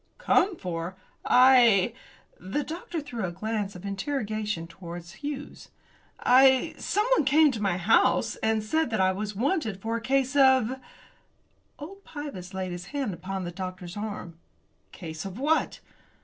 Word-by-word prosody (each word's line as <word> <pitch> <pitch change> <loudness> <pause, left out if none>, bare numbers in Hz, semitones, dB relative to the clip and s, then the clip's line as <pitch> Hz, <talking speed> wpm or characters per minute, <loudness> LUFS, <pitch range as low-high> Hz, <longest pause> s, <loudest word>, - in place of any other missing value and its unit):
"Come 385 -1 +2
for? 175 0 -5 0.3
I 240 -5 +5 0.2
" - - -32
The 295 - +1
doctor 335 +1 -5
threw 245 -7 -6
a 180 - -2
glance 205 +1 -3
of 180 +2 -10
interrogation 210 - -3
towards 170 0 -9
Hughes. 290 0 -6 0.5
"I 260 +1 +5
someone 430 -2 +2
came 295 +2 +5
to 225 -4 -5
my 195 -4 +1
house 185 +5 +3
and 220 -1 0
said 315 +6 0
that 220 -3 -1
I 190 0 +4
was 205 +2 -4
wanted 230 - -1
for 225 +3 -3
a - - -6
case 265 +2 0
of 265 -2 +4 0.5
" - - -42
Old 390 +7 -10
Pybus 280 - -7
laid 185 -1 -3
his 175 +1 -7
hand 275 -9 -3
upon 190 +2 -5
the 175 - -5
doctor's 185 -1 -7
arm. 205 -6 -6 0.5
"Case 160 -3 -7
of 195 +1 -7
what?" 300 +5 0
220 Hz, 155 wpm, -27 LUFS, 185-275 Hz, 0.5 s, I